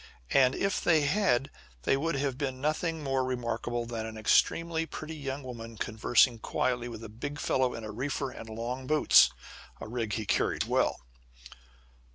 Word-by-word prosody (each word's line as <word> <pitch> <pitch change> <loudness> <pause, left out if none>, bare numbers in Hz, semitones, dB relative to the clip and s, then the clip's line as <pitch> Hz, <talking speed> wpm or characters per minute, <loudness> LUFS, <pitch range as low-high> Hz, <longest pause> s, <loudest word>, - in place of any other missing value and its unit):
And, 130 -1 +4
if 195 0 0
they 160 -3 +4
had, 145 -4 +2 0.3
they 135 - +3
would 165 +4 -1
have 135 -2 -1
seen 130 -2 -2
nothing 155 +2 -1
more 135 -1 0
remarkable 120 -1 -2
than 115 -1 -4
an 110 0 -8
extremely 165 +8 +2
pretty 160 0 -7
young 140 -1 -5
woman 115 -3 -8
conversing 115 +3 +3
quietly 120 +1 -1
with 115 -1 -8
a - - -6
big 130 +7 -6
fellow 130 -1 +1
in 115 - -7
a 110 - -5
reefer 135 +3 -3
and 115 - -9
long 120 +4 -4
boots 155 +1 +6 0.5
a - - -7
rig 115 -2 -3
he 110 0 -2
carried - - +1
well. - - +1
130 Hz, 170 wpm, -29 LUFS, 115-145 Hz, 0.5 s, boots